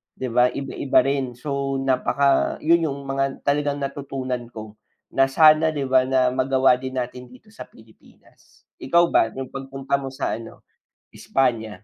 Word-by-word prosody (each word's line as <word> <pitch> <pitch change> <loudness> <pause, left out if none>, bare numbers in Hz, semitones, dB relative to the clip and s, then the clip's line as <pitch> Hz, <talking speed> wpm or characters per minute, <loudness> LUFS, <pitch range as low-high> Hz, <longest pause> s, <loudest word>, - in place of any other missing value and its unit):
'di 130 - -4
ba, 125 +1 +4
iba-iba 140 0 0
rin 135 -2 -2
so 140 +1 -3
napaka 135 +1 +1
'yon 165 +1 +3
'yong 140 0 -5
mga 135 0 -2
talagang 145 0 0
natutunan 135 -3 -5
ko 110 -2 -10 0.4
na 135 0 +4
sana, 155 +1 +5
'di 140 -3 -3
ba 130 0 +4
na 130 -1 +2
magawa 130 0 +3
din 130 0 -6
natin 125 0 -6
dito 125 - -18
sa - - -9
Pilipinas. 110 0 -23 0.2
Ikaw 170 +6 +4
ba 115 - +3
'yong 130 +1 -6
pagpunta 135 0 -3
mo 135 - -6
sa 135 +1 -3
ano, 115 0 -11 0.5
Espanya? 110 -6 -2
135 Hz, 155 wpm, -22 LUFS, 125-140 Hz, 0.5 s, sana